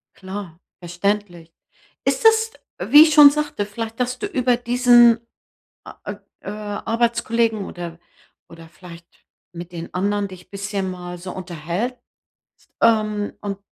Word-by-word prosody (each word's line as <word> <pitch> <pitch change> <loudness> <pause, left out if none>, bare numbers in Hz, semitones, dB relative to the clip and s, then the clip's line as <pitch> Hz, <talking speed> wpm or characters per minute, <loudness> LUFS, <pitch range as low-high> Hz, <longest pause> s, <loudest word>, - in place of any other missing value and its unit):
Klar, 190 -3 -8 0.2
verständlich. 175 -1 -3 0.5
Ist - - 0
das, 445 0 +4 0.4
wie 295 +2 +11
ich 315 -1 +2
schon 295 -2 +9
sagte, 295 -8 -2
vielleicht, 225 +2 -7
dass 250 +1 -2
du - - -3
über 255 -9 +1
diesen 240 -1 +5 0.6
a - - -13
äh, - - -7 0.3
äh, - - -7
Arbeitskollegen, 225 +1 -1
oder 170 -2 -8 0.5
oder 165 -1 -13
vielleicht 170 0 -13 0.5
mit 175 0 -9
den 170 -1 -8
anderen 200 +2 -1
dich 185 -2 -14
bisschen 200 -1 -4
mal 180 -1 -8
so 180 +1 -8
unterhältst, 180 +7 -4 0.8
ähm, 215 -2 +2
und, 200 -1 -5
205 Hz, 130 wpm, -21 LUFS, 180-235 Hz, 0.8 s, wie